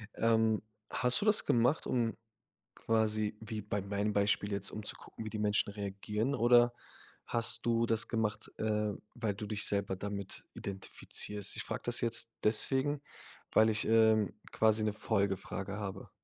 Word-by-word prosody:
Ähm, 110 -1 +2 0.3
hast 125 +3 +2
du - - -1
das 210 -1 +4
gemacht, 125 +6 +2
um 115 -4 0 0.6
quasi, 110 -1 0
wie 110 -1 -5
bei 105 0 -3
meinem 100 +2 -1
Beispiel 100 0 +1
jetzt, 100 -1 -2
um 105 - -6
zu - - -1
gucken, 110 - -10
wie - - -4
die 110 - -5
Menschen 105 -1 +1
reagieren? 105 +5 -3
Oder 120 0 +5 0.5
hast 115 -1 +2
du 115 0 +2
das 115 -1 +2
gemacht, 110 -3 -2
äh, 105 -1 0 0.2
weil 110 -5 -2
du 105 - -6
dich 105 -1 +1
selber 100 -1 0
damit 100 0 -6
identifizierst? 100 +1 -2
Ich - - -2
frage - - -5
das 120 0 +3
jetzt 115 0 0
deswegen, 135 +6 +2 0.5
weil 110 +1 +5
ich, 110 -1 0
ähm, 110 -2 +4 0.2
quasi 110 0 +3
'ne 105 - 0
Folgefrage 100 -2 -2
habe. 100 -2 -6
110 Hz, 160 wpm, -33 LUFS, 105-115 Hz, 0.6 s, Oder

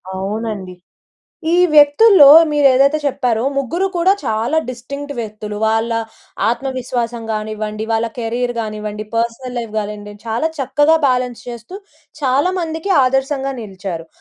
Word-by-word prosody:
అవునండి. 200 -1 -4 0.8
ఈ - - +4 0.2
వ్యక్తుల్లో 295 +3 +7 0.2
మీరు 295 -1 +3
ఏదైతే 280 +4 +3
చెప్పారో. 245 -4 0
ముగ్గురు 335 +8 -1
కూడా 355 +3 +4
చాలా 225 +8 0
డిస్టింక్ట్ 280 +4 -6
వ్యక్తులు. 210 -2 -6
వాళ్ళ 225 +1 0 0.6
ఆత్మవిశ్వాసం 245 -2 -3
గానివ్వండి, 215 0 -4
వాళ్ళ 225 +1 +1
కెరియర్ 240 +2 -2
గానివ్వండి 215 -1 -5
పర్సనల్ 235 +2 -2
లైఫ్ 230 -2 -6
గానివ్వండి, 210 -1 -4
చాలా 230 +8 0
చక్కగా 290 +4 +3
బ్యాలెన్స్ 250 -2 -1
చేస్తూ, 235 - -8 0.4
చాలామందికి 320 +6 -1
ఆదర్శంగా 270 +1 -1
నిలిచారు. 190 -5 -7
240 Hz, 115 wpm, -17 LUFS, 215-280 Hz, 0.8 s, వ్యక్తుల్లో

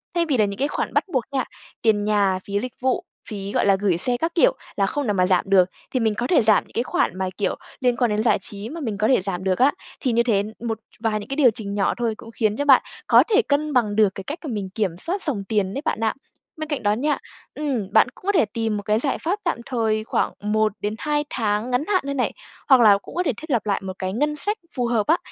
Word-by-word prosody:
Thay 340 -1 +2
vì 285 -6 +1
là 215 - +4
những 200 0 -4
cái 280 - +2
khoản - - -3
bắt - - +3
buộc 255 -3 +2
nha, 265 -3 0 0.4
tiền 215 -2 +3
nhà, 200 -3 +2
phí 200 0 0
dịch 250 +2 -5
vụ, 260 0 +1 0.3
phí, 200 -2 -5
gọi - - +1
là, 200 -1 +5
gửi 190 -5 +1
xe 245 +6 0
các 330 +4 -2
kiểu, - - +4 0.2
là 195 - +2
không 285 +4 -2
nào 210 - +2
mà 185 -2 +3
giảm 185 -2 +3
được, 185 -2 +5 0.2
thì 255 - 0
mình 220 -2 +1
có 240 +3 -2
thể 320 - +4
giảm 215 -1 +4
những - - -21
cái 235 - 0
khoản 185 - 0
mà, 190 -1 -1
kiểu, 205 - 0 0.3
liên 245 -1 +2
quan 240 -4 +2
đến 210 +1 0
giải 225 - +3
trí, 205 +3 -8
mà 325 +2 -6
mình 220 -6 -3
có 215 +1 +2
thể 255 -8 +4
giảm 185 -1 -4
được 190 +1 0
á. 275 +3 +5 0.3
Thì 255 - 0
như 235 +1 +3
thế, 205 -4 +2 0.2
một 225 -1 -2 0.2
vài 220 -2 0
những 205 - -10
cái 275 - -2
điều 270 -6 +5
chỉnh 200 -2 -6
nhỏ 200 -1 +1
thôi, 235 -2 0
cũng 225 - -12
khiến 215 -2 0
cho 285 - -1
bạn 270 -3 +7 0.3
có - - +7
thể 445 +2 +5
cân 300 -5 0
bằng 215 -5 +2
được 215 -2 +5
cái 195 - -6
cách 295 - -5
cả 305 - -6
mình 200 -4 -3
kiểm 205 -5 +1
soát 370 - -3
dòng 240 -11 -2
tiền 195 -1 -1
đấy 275 - -3
bạn - - 0
ạ. 220 -1 +1 0.4
Bên 310 -1 -4
cạnh 290 -6 -2
đó 205 0 +3
nha 290 +6 0 0.4
ừm, 260 -10 -3
bạn - - +6
cũng - - -17
có 405 - +3
thể 330 - +3
tìm 220 0 -2
một 205 - -5
cái 215 +2 +1
giải 275 +1 0
pháp 375 +6 -2
tạm 340 - 0
thời 220 -4 0
khoảng - - -1
1-2 215 +7 0
tháng 220 +1 -1
ngắn 245 +4 +1
hạn 380 -3 +2
nơi 280 - -2
này, 255 - 0 0.4
hoặc 260 -2 +7
là 205 -3 +7
cũng - - -13
có 360 - +1
thể 280 - +2
thiết 315 - -10
lập 235 -5 +1
lại 200 -2 0
một 190 -1 -5
cái 185 0 -2
ngân 300 +6 0
sách 415 +7 0 0.2
phù 245 -3 0
hợp 225 -3 +1
á, 330 +3 +4
225 Hz, 280 wpm, -23 LUFS, 205-275 Hz, 0.4 s, bạn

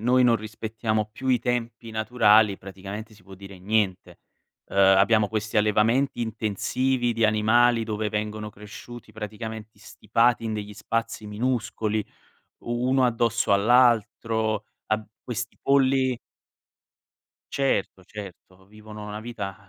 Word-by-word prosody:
noi 125 +3 +3
non 120 -1 +5
rispettiamo 110 0 -3
più 130 +4 -5
i 125 - +4
tempi 120 -1 -3
naturali, 110 -2 +4
praticamente 100 +3 -8
si 100 - -20
può 95 +1 -13
dire 95 0 -12
niente. 95 -1 -1 0.5
Uhm, - - -8
abbiamo 100 +2 +5
questi 110 0 -3
allevamenti 110 +6 +2
intensivi 120 +3 -1
di 115 0 +1
animali 115 +2 +3
dove 110 -1 -2
vengono 105 0 -3
cresciuti 105 +3 -11
praticamente 110 0 -7
stipati 115 +3 +1
in 110 - -2
degli 105 -1 -5
spazi 115 0 -3
minuscoli, 110 -1 -1 0.6
uno 125 +2 +1
addosso 115 -3 +1
all'altro, 110 -1 +2 0.2
ab 110 0 -1 0.2
questi 120 -2 -5
polli 135 -2 +3 1.4
Certo, 130 -8 -1
certo. 95 -1 -11
Vivono 105 +1 -11
una 105 0 -6
vita 105 -4 -6
110 Hz, 120 wpm, -25 LUFS, 105-120 Hz, 1.4 s, non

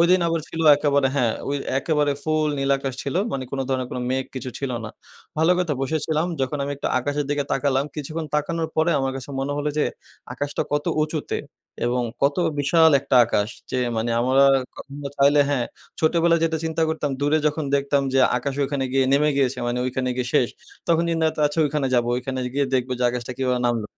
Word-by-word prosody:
ওইদিন 180 +2 +5
আবার 165 -1 0
ছিল 165 - -5 0.2
একেবারে 140 -2 +2
হ্যাঁ, 120 -4 +2 0.2
অ - - -1 0.3
একেবারে 145 0 +1
ফুল 155 -1 +1
নীলাকাশ 135 -1 0
ছিল, 140 - -4 0.2
মানি 135 -1 -3
কোনো 135 -1 -1
ধরনের 130 -1 -1
কোনো 125 - -4
মেঘ 130 0 0
কিছু 130 0 -5
ছিল 135 -2 -3
না। 110 - -6 0.5
ভালো 165 +3 +4
কথা 175 -5 0
বসেছিলাম, 155 +3 0
যখন 135 +3 -1
আমি 140 - -2
একটু - - -4
আকাশের 145 +3 -1
দিকে 145 -1 0
তাকালাম, 135 0 +1
কিছুক্ষণ 155 +2 -4
তাকানোর 160 +2 -1
পরে 160 +2 +3
আমার 135 0 -1
কাছে 135 +1 -8
মনে 140 +1 -2
হলো 145 +1 -1
যে - - +3 0.5
আকাশটা 145 0 -2
কত 145 0 0 0.2
উঁচুতে। 155 -1 -2 0.5
এবং 125 0 0 0.2
কত 140 +1 +3 0.2
বিশাল 160 +3 +5
একটা 135 -1 +1
আকাশ 105 -2 0 0.2
যে 130 - -1 0.2
মানি 115 +1 -1
আমার 130 +2 +2 0.4
ক - - -49
আমরা 140 0 -6
চাইলে 140 +1 +5
হ্যাঁ, 125 -4 0 0.3
ছোটবেলায় 170 0 +3
যেটা 160 -1 0
চিন্তা 160 0 -1
করতাম 155 -2 -1
দূরে 145 +2 +2
যখন 150 +1 0
দেখতাম 140 0 +1
যে 135 - +4 0.2
আকাশ 135 +2 -3
ওখানে 135 -1 -2
গিয়ে 135 0 +3
নেমে 150 +2 +4
গিয়েছে। 135 -2 +1
মানি 120 +1 -1
ওইখানে 130 0 -1
গিয়ে 125 -1 -2
শেষ। 120 - +4 0.4
তখন 170 0 +3
চিন্তা 165 -1 0
করতাম, 155 - -2
আচ্ছা 150 +3 -1
ওইখানে 145 -1 0
যাবো। 120 -1 +2
ওইখানে 130 +1 -4 0.2
গিয়ে 140 0 +1
দেখবো 130 0 0
যে - - -2
আকাশটা 125 0 -5
কিভাবে 125 -1 0
নামল 115 -3 0
140 Hz, 200 wpm, -23 LUFS, 130-155 Hz, 0.5 s, ওইদিন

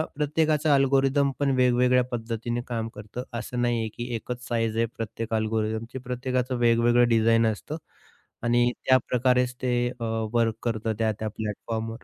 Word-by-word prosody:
प्रत्येकाचं 155 +1 +1
अल्गोरिदम 135 +1 +3
पण 140 -1 +2
वेगवेगळ्या 125 0 +4
पद्धतीने 120 0 -3
काम 115 -2 -2
करतं. 105 +4 -7 0.2
असं 120 +1 -4
नाही 120 -1 +1
आहे, 110 - -1
की 120 - -4
एकच 125 +1 -6
साइझ 115 -2 0
आहे 115 +1 +2
प्रत्येक 115 0 -4
अल्गोरिदमची. 110 +2 -1
प्रत्येकाचं 125 0 -2
वेगवेगळं 120 0 +4
डिझाईन 115 0 +4
असतं 105 -9 -3 0.7
आणि 120 +1 +3
त्या 130 0 +6
प्रकारेच 125 0 +2
ते 125 -1 +1 0.2
अ, - - -4 0.3
वर्क 115 -2 +2
करतं 110 -1 -1
त्या-त्या 110 -1 -1
प्लॅटफॉर्मवर 110 +2 -5
120 Hz, 145 wpm, -26 LUFS, 115-125 Hz, 0.7 s, त्या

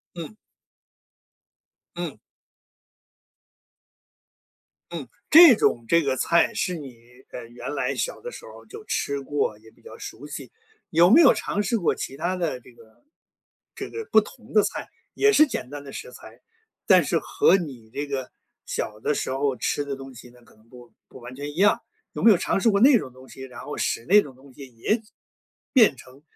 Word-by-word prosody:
嗯。 170 +6 -8 1.6
嗯。 - - -5 2.7
嗯， - - -6 0.2
这 320 -6 +9
种 120 - +1
这 170 -1 +3
个 135 -2 0
菜， 170 +6 +2
是 180 - -2
你， 135 -6 -10 0.3
呃， 120 -2 -8
原 120 +4 -7
来 - - -2
小 - - -3
的 485 - -7
时 - - -11
候 - - -13
儿 - - -20
就 435 0 -11
吃 140 0 -2
过， 135 -6 -2
也 110 0 -18
比 - - -27
较 - - -12
熟 145 +6 -9
悉。 - - -8 0.4
有 170 +3 +5
没 300 +10 +7
有 275 - +7
尝 205 - -2
试 225 +4 0
过 170 - +1
其 135 - -6
它 175 +5 -2
的 165 -8 -2
这 125 - -18
个 110 - -21 0.7
这 - - -7
个 450 -1 -6
不 220 - +6
同 225 +1 -14
的 210 - +6
菜， - - -4 0.3
也 425 0 +4
是 305 -4 +6
简 125 - -5
单 145 0 -8
的 140 - -10
食 485 +2 -8
材， - - -14 0.5
但 - - +6
是 - - 0
和 195 - +3
你 130 -10 -8
这 145 +5 -4
个 135 -2 -4 0.4
小 105 0 -4
的 150 - 0
时 - - -3
候 135 0 0
吃 145 - -1
的 140 -1 -5
东 135 -1 -11
西 120 +1 -13
呢 120 0 -20
可 - - -23
能 110 +2 -26
不 120 -3 -16
不 130 - -14
完 120 +1 -10
全 145 +1 -6
一 - - -15
样， 200 +3 +3 0.3
有 - - -6
没 230 - +7
有 200 - +6
尝 - - -1
试 230 - +4
过 200 -1 +2
那 260 +1 +7
种 130 - -8
东 130 +1 -16
西？ 130 - -13
然 125 -2 -9
后 - - -7
使 115 - -2
那 205 +4 +6
种 135 -3 -11
东 130 0 -18
西 135 0 -11
也 215 - 0 0.7
变 220 - +5
成 130 +3 -16
145 Hz, 210 characters per minute, -24 LUFS, 125-205 Hz, 2.7 s, 这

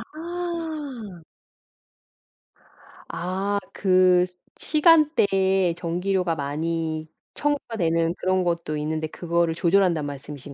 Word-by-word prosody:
아. 315 - -5 1.9
아 195 +3 -2
그 185 -2 +4 0.3
시간대에 200 - +3
전기료가 180 +1 -1
많이 155 +2 -3 0.3
청구가 290 -5 -2
되는 165 -2 +1
그런 185 0 +1
것도 170 -3 -1
있는데 155 +1 -2
그거를 170 0 -1
조절한다는 170 -3 +2
말씀이신 140 0 -8
180 Hz, 210 characters per minute, -24 LUFS, 165-205 Hz, 1.9 s, 그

